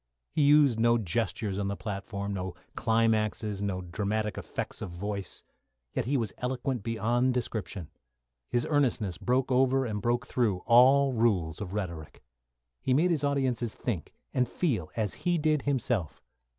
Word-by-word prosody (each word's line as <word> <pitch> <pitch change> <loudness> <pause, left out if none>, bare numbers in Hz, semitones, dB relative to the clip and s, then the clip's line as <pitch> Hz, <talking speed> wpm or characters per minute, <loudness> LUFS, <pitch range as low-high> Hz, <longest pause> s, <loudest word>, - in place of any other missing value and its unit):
He - - +1
used 145 -5 +5
no 120 +1 +4
gestures 110 -1 -1
on 100 - -1
the 100 - -2
platform, 100 +1 -4
no 95 -2 -4 0.2
climaxes, 110 -2 +1
no 95 -2 -1
dramatic 105 +4 -2
effects - - -5
of - - -4
voice, 100 +2 -4 0.5
yet - - -1
he 140 +3 +1
was 115 -5 -2
eloquent 125 0 -2
beyond 120 +4 +1
description. 105 -8 -3 0.6
His 120 - +1
earnestness 115 - +1
broke 130 +1 +1
over 130 +1 +3
and 105 -3 -3
broke 120 +4 0
through 105 -10 0
all 130 +3 +6
rules 105 -8 +1
of 95 -2 -5
rhetoric. 85 -7 -5 0.6
He 130 - +2
made 175 +5 +3
his 155 -4 0
audiences 130 -5 0
think 100 - -3 0.2
and 125 -2 +1
feel 115 - -1
as 110 -3 0
he 175 -1 +2
did 155 -2 +2
himself. 120 - -1
115 Hz, 150 wpm, -29 LUFS, 100-130 Hz, 0.6 s, all